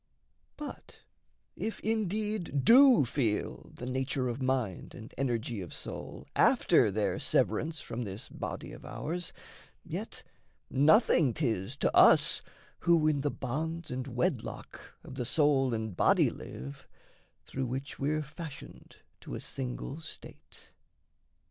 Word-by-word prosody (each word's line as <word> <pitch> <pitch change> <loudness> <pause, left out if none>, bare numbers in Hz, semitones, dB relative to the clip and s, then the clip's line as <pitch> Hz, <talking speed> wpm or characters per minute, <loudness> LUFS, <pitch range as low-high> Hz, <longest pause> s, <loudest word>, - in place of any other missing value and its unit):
But 300 -1 -9 0.5
if 220 - -4
indeed 210 -7 -1
do 250 - +8
feel 115 -4 -2
The 125 - -8
nature 130 0 -1
of 120 +3 -4
mind 130 -8 -1
and 115 -2 -11
energy 120 -4 -2
of 90 - -7
soul, - - -6
After - - +4
their 100 0 -1
severance 155 -1 +1
from 120 -4 -5
this 105 +3 -6
body - - -6
of - - -11
ours, 170 +2 -4 0.5
Yet - - -6 0.5
nothing 145 - +4
'tis 115 - -1
to - - 0
us - - +7 0.4
who 170 -3 +3
in 145 -2 +2
the 145 - 0
bonds 155 +6 -4
And 130 +1 -3
wedlock 125 -1 -3
of - - -10
the 130 -2 -3
soul 135 -1 +3
and 110 -4 -3
body - - +4
live, 70 +2 -9 0.6
Through 135 -1 -3
which 135 +4 -5
we're 150 +2 0
fashioned 150 0 -10 0.2
to - - -7
a - - -4
single 135 +3 -5
state. 160 - -13
135 Hz, 130 wpm, -30 LUFS, 120-160 Hz, 0.6 s, do